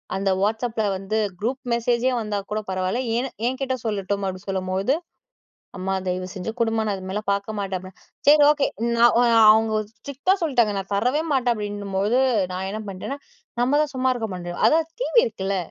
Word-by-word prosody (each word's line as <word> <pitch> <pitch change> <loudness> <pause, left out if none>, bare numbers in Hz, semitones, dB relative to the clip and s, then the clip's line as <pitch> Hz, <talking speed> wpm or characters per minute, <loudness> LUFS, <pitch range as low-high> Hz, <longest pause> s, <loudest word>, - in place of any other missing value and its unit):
அந்த 195 0 0
WhatsAppல 220 +2 0
வந்து 195 +3 -3 0.2
குரூப் 255 +5 -2
மெசேஜே 240 +2 +1
வந்தா 210 -2 -2
கூட 215 +1 -1
பரவால்ல, 185 +5 -1 0.2
ஏன் 260 +2 -1 0.2
எங்கிட்ட 260 0 -1
சொல்லட்டும் 200 -1 -2
அப்படி 185 -1 -4
சொல்லும்போது, 190 +5 0 0.8
அம்மா 190 +1 -2
தயவு 185 0 -2
செஞ்சு 195 +2 -4
குடுமா 225 -1 +1
நான் 205 - 0
அது 190 - -9
மேல 200 +3 -2
பாக்க 200 +2 -1
மாட்டேன் 195 -2 -2
அப்பனா. 185 +1 -12 0.3
சரி 295 +1 +7
ஓகே 290 -2 +2 0.3
நான் 235 +1 +5 0.4
அவங்க, 220 0 +2 0.2
ஸ்ட்ரிக்ட்டா 280 +8 0
சொல்ட்டாங்க 240 -9 +2
நான் 195 0 -5
தரவே 250 +10 +1
மாட்டேன் 250 -3 +2
அப்டின்னும்போது, 205 +2 -1 0.3
நான் 190 +1 -3
என்ன 215 +2 -4
பண்ட்டேன்னா, 200 +9 -5 0.4
நம்மதான் 290 +4 +2
சும்மா 260 0 +1
இருக்க 225 -3 -3
மாட்டோமே. 175 -1 -6
அதான் 320 0 +3
டிவி - - +4
இருக்குல்ல, 195 - -2
215 Hz, 165 wpm, -23 LUFS, 195-255 Hz, 0.8 s, சரி